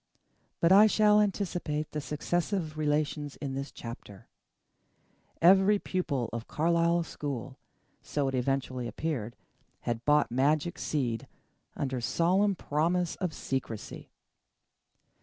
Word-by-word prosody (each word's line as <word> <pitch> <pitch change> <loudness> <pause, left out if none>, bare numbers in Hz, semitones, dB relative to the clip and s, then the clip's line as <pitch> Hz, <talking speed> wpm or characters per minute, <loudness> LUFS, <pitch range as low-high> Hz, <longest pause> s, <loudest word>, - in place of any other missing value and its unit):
But 170 - +3
I 205 +3 +8
shall 210 0 +5
anticipate 175 -7 -2
the 150 - -3
successive 165 +3 -2
relations 150 -1 -1
in 140 -2 -5
this 135 +1 -4
chapter. 115 -4 -10 1.2
Every 190 +3 +6
pupil 150 - -2
of 115 0 -5
Carlisle 170 +1 +2
school, 135 -5 -6 0.4
so 145 -2 -1
it 135 - -2
eventually 130 -1 -1
appeared, 120 -6 -3 0.5
had 120 -1 -3
bought 150 -1 +3
magic 150 +6 +1
seed, 120 -7 -2 0.5
under 130 -3 -2
solemn 185 - +2
promise 170 +3 0
of 180 -3 -2
secrecy. 130 -7 -5
150 Hz, 110 wpm, -29 LUFS, 135-175 Hz, 1.2 s, I